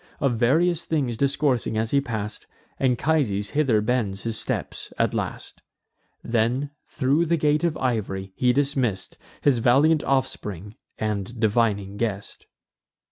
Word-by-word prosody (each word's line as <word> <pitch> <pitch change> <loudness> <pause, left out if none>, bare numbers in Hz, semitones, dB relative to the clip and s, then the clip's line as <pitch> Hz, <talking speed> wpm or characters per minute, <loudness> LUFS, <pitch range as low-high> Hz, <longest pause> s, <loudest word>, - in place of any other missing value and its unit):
Of 135 -4 +2
various 160 +8 +2
things 140 -7 0
discoursing 135 -3 0
as 110 0 -1
he 140 - +3
pass'd, 110 -5 -5 0.3
Anchises 125 -6 +1
hither 135 -8 +2
bends 105 -4 -1
his 115 -1 -2
steps - - -3
at - - +1
last. - - -5 0.6
Then, 120 +5 0 0.2
thro' 140 +4 +1
the 170 0 +1
gate 150 +1 +2
of 170 -2 +1
iv'ry, 95 -6 -2
he 125 -1 +3
dismiss'd 130 -8 -1 0.3
His 135 -5 +3
valiant 145 +7 +4
offspring 105 -7 -2 0.2
and 105 +2 -3
divining 105 -3 +1
guest. 105 -3 -4
120 Hz, 130 wpm, -24 LUFS, 105-140 Hz, 0.6 s, valiant